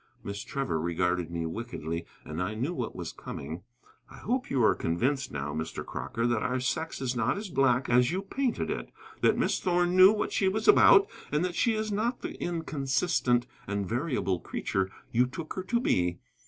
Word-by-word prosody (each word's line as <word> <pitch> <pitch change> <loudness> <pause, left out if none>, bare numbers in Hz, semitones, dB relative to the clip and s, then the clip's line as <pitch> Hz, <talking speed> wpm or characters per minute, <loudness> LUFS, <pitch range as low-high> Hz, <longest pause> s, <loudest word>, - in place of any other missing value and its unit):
Miss 100 0 -5
Trevor 135 - -2
regarded 90 0 0
me 85 -1 -3
wickedly, 85 -4 -4 0.2
and 75 +3 -4
I 100 +4 -2
knew 130 +10 -1
what 125 -8 -4
was 90 -2 -5
coming. 80 +5 -7 0.5
"I - - -13
hope 255 +2 -2
you 130 -4 +2
are - - +6
convinced, 130 +12 -1
now, 75 0 -3
Mr. 80 +1 -4
Crocker, 70 - -3
that 120 -2 +1
our 125 +1 0
sex 160 +6 -2
is 130 -1 -1
not 120 - +1
as 205 -1 -5
black 135 -4 +2
as 125 0 +4
you 185 +4 -2
painted 260 +4 -1
it: - - -4 0.3
that - - +4
Miss - - +1
Thorn 175 -1 +1
knew 185 +1 +9
what 215 - -1
she 195 - +2
was 215 +3 0
about, 405 -1 +8 0.2
and 150 +4 +1
that 180 - -2
she 230 +5 +2
is 215 0 -2
not 225 +5 -1
the - - -4
inconsistent 145 -5 0 0.2
and 100 -1 -2
variable 115 - -1
creature 95 +3 -2 0.2
you 125 +2 +3
took 155 +5 -6
her 185 - -3
to 235 +4 +1
be." 90 - +1
125 Hz, 195 wpm, -29 LUFS, -, 0.5 s, knew